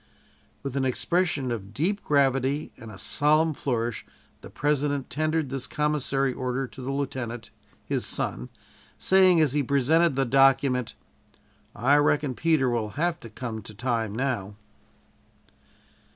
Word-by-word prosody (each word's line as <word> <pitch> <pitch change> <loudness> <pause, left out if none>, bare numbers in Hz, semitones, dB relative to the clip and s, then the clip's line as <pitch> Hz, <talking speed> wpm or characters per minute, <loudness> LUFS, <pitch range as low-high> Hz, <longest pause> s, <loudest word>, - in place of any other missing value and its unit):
With 140 -1 -5
an 135 - 0
expression 145 0 0
of 105 -2 -6
deep 200 +7 0
gravity 140 0 +1
and 115 - -11
a 100 - -10
solemn 155 - +2
flourish, 120 -5 -2 0.4
the - - -11
President 145 -2 -1
tendered 155 0 0
this 135 -1 -3
Commissary 140 -3 0
Order 130 +1 -2
to 130 - -11
the 130 - -5
lieutenant, 130 -4 -4 0.3
his - - -1
son, - - -3 0.5
saying 185 -2 +5
as 145 -4 +2
he 145 - +2
presented 140 +4 +2
the 135 0 +1
document: 135 -1 +3 0.8
"I 135 +7 +3
reckon 145 -2 +2
Peter 155 -1 +2
will 115 -3 -1
have 170 +1 0
to 115 - -10
come 110 0 -6
to 105 +1 -11
time 115 -2 -2
now." 115 -6 -2
135 Hz, 135 wpm, -26 LUFS, 120-150 Hz, 0.8 s, saying